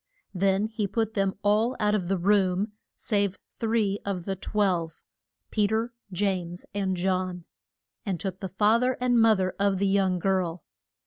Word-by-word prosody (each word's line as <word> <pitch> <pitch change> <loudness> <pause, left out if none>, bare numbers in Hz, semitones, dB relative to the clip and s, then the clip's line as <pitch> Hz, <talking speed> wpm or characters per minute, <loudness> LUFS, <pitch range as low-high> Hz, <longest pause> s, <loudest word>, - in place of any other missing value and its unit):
Then 195 +2 +2
he 220 -2 -2
put 220 +2 -1
them 195 -2 0
all 215 +5 +2
out 210 -1 +2
of 190 -5 0
the 195 +1 +1
room 195 +2 +2 0.2
save 200 -2 0 0.2
three 220 -3 +1
of 185 -4 -3
the 195 - -2
twelve 185 -5 -1 0.5
Pe 210 -2 +2
ter, 225 +3 -1 0.2
James, 180 -2 -2
and 190 -2 -1
John 185 -1 -1 0.6
and 195 -5 -2
the 190 +1 -4
fa 210 +4 +3
ther 255 0 +1
and 245 -2 +3
mo 225 -1 +6
ther 185 -1 -1
of 200 -1 +2
the 200 - +1
young 195 -2 +2
girl. 180 -2 0
195 Hz, 165 wpm, -27 LUFS, 185-210 Hz, 0.6 s, mo